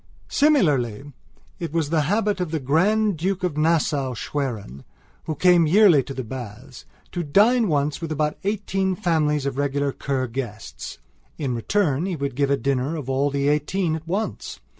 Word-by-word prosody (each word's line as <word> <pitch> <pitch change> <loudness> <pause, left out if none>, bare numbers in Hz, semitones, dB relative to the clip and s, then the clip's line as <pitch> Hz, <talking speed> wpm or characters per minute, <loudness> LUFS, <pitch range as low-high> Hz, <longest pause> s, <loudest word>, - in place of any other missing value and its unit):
Similarly 145 - +2 0.5
it 170 -3 -4
was 160 -2 -1
the 160 -2 +3
habit 210 -1 +1
of 180 - -2
the 160 0 -2
Grand 190 +8 +2
Duke 185 +3 -2
of 180 -5 -1
Nassau 150 -4 +1
Schwerin, 110 - -4 0.4
who 155 - -3
came 175 0 +4
yearly 180 -4 +6
to 135 - -7
the 130 - -3
baths, 120 +1 -9 0.3
to 175 - -2
dine 215 - +4
once 145 -2 0
with 165 -1 -4
about 150 0 -1
eighteen 195 -2 -1
families 155 -6 +1
of 140 0 -2
regular 140 0 0
Kur 135 -1 -2
guests. 115 - -6 0.4
In 135 -5 -2
return 155 - 0
he 185 - -2
would 140 -2 -3
give 140 0 +1
a 140 - +2
dinner 135 +4 -1
of 140 -4 -4
all 140 +2 +1
the 140 0 -1
eighteen 155 +3 +1
at 160 0 -8
once. 200 +6 -3
150 Hz, 170 wpm, -23 LUFS, 135-180 Hz, 0.5 s, yearly